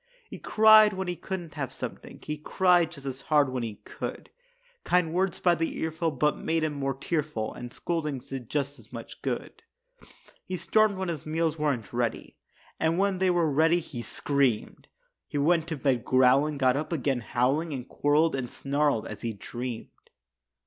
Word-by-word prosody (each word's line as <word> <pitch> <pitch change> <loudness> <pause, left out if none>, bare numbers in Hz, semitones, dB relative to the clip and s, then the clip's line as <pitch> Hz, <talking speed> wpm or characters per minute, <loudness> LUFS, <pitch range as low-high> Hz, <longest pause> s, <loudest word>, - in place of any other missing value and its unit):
He - - -7
cried 215 -1 +6
when 190 0 -3
he 180 - -2
couldn't 175 -3 -6
have 140 -4 -4
something; - - -7
He 150 - -3
cried 175 +2 +3
just 140 -5 -11
as 135 0 -5
hard 145 -3 +3
when 130 -1 -2
he 110 -3 -4
could; - - -6 0.5
Kind 180 -3 +2
words 185 +1 0
by 175 - +4
the 165 -1 -2
earful 160 +1 -1
but 150 0 +1
made 165 0 0
him 155 -1 0
more 135 -2 -2
tearful, 145 -6 -2
And 120 0 -8
scoldings 150 -6 -3
did 130 -4 -6
just 140 -2 -2
as 110 - -18
much 115 -2 -9
good. - - -4 0.8
He 185 - -4
stormed 215 +1 +2
when 190 -1 -2
his 155 -3 -5
meals 160 0 0
weren't 135 -8 -1
ready, 120 -2 -2 0.4
And 160 +1 +1
when 195 -1 +1
they 190 0 +3
were 175 -2 +2
ready, 160 +4 +4
he 140 -7 -7
screamed. 135 -3 -1 0.4
He 145 - -4
went 165 +3 +2
to 160 -3 -3
bed 130 -3 +1
growling, 130 +4 +4
got 130 -2 +3
up 150 +3 -3
again 140 -5 0
howling 135 +8 0
And 130 -3 -5
quarreled 150 +3 +2
and 125 -3 -3
snarled 140 -4 0
as - - -7
he 115 -1 -2
dreamed. 120 +3 -6
150 Hz, 180 wpm, -27 LUFS, 130-170 Hz, 0.8 s, cried